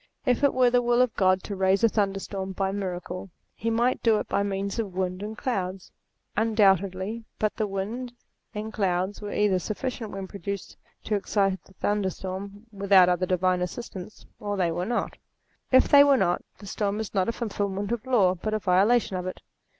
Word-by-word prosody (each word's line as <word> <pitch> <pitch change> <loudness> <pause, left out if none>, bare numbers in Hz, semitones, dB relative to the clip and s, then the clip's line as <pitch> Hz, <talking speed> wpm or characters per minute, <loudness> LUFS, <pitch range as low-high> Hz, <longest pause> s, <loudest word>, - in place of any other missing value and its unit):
If 250 +1 +2
it 280 - +4
were 250 -1 +4
the 245 0 +4
will 240 0 +2
of 250 -2 +3
God 185 -1 +2
to 200 - -5
raise 190 +2 +2
a - - +8
thunderstorm 195 -2 -2
by 190 0 -1
miracle, 185 -1 -4 0.2
he 230 - -3
might 240 +3 +1
do 225 -2 +4
it - - -3
by - - 0
means 200 +1 -2
of 200 -5 -3
winds 185 +1 -2
and 215 +1 -6
clouds. 190 -8 -3 0.4
Undoubtedly; 200 -1 +2
but 215 -1 0
the 215 - -1
winds 215 +6 -4 0.4
and 215 +1 -5
clouds 190 0 -1
were 205 -1 -5
either 205 -3 +2
sufficient 225 +4 -4
when 195 -1 -5
produced 200 0 -6 0.3
to 215 - -2
excite 195 -2 0
the 190 - -20
thunderstorm 200 +1 -3
without 195 -3 +5
other 180 +1 +1
divine 185 0 +1
assistance, 185 +1 -6
or 205 -1 -3
they 175 -3 +1
were 175 +3 -2
not. 240 - -2 0.5
If 260 0 +6
they 285 -1 +8
were 280 -1 +5
not, 175 -5 +1 0.2
the 205 - -12
storm 205 +1 -2
is 220 - -5
not 190 +1 +1
a - - +2
fulfilment 205 -3 -3
of 235 -2 -2
law, 205 -8 +4
but 215 +4 -3
a - - 0
violation 200 +2 +3
of 180 0 -4
it. 185 - -5
200 Hz, 190 wpm, -26 LUFS, 190-220 Hz, 0.5 s, a